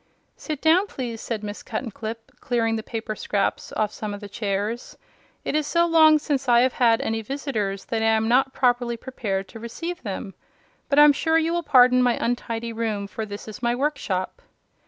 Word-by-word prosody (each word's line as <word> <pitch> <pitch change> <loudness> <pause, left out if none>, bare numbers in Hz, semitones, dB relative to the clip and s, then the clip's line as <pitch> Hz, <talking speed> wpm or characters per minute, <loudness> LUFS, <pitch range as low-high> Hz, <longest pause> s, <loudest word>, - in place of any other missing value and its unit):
"Sit 305 -3 -6
down, 345 +6 +4
please," 235 - -5
said 220 -3 -4
Miss 205 0 -6
Cuttenclip, 225 -1 -6
clearing 230 -3 0
the 220 - -2
paper 220 -1 -5
scraps 200 -1 -1
off 215 -1 0
some 210 -1 -5
of - - -9
the 205 - -8
chairs. 205 +2 -3 0.5
"It - - -1
is 305 -1 0
so 340 +2 +3
long 320 -2 +6
since 280 -4 -2
I 240 0 +6
have 255 0 +2
had 230 -2 +3
any 225 0 -1
visitors 220 -6 -3
that 225 -1 -2
I - - +1
am 220 0 +2
not 260 +3 +3
properly 245 -2 +1
prepared 205 -6 -4
to 225 - -10
receive 330 +10 -6
them. 195 -2 -5 0.6
But 280 - +1
I'm 295 0 +8
sure 320 +3 +2
you 325 +1 +1
will 345 - 0
pardon 255 -4 +5
my 245 -1 +3
untidy 230 -1 -2
room, 220 -3 -2
for 215 +2 -6
this 205 +1 -8
is 215 - -9
my 240 0 +1
workshop." 280 - -2
235 Hz, 195 wpm, -24 LUFS, 215-275 Hz, 0.6 s, I'm